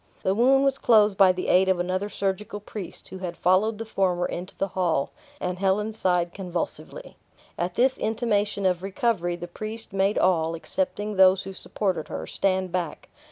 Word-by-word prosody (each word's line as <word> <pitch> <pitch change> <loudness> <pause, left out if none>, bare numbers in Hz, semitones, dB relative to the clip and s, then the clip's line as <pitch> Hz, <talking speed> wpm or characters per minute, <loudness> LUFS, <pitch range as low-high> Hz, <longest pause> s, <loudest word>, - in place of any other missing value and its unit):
The 190 - +2
wound 265 +5 +4
was 275 -1 +1
closed 210 -3 +4
by 195 -1 +6
the 180 0 -4
aid 190 +1 +4
of 185 -2 +2
another 185 +3 -1
surgical 200 +1 -3
priest, 205 -2 -8
who 190 - -8
had 180 -2 -5
followed 195 +5 +2
the 225 - -5
former 185 -4 0
into 180 +2 -6
the 195 - -1
hall, 175 -7 0 0.3
and 180 0 -3
Helen 200 +3 +1
sighed 180 -4 0
convulsively. 190 - -5 0.4
At 175 +1 -3
this 260 +2 +2
intimation 210 -3 0
of 180 -2 +2
recovery, 195 -2 -1
the 175 0 -7
priest 215 +4 -7
made 195 +1 +1
all, 165 -3 +2
excepting 210 - -3
those 190 0 +6
who 195 - -7
supported 185 -4 -3
her, - - -5
stand 190 -2 -1
back. 175 -4 -4
190 Hz, 175 wpm, -25 LUFS, 180-210 Hz, 0.4 s, by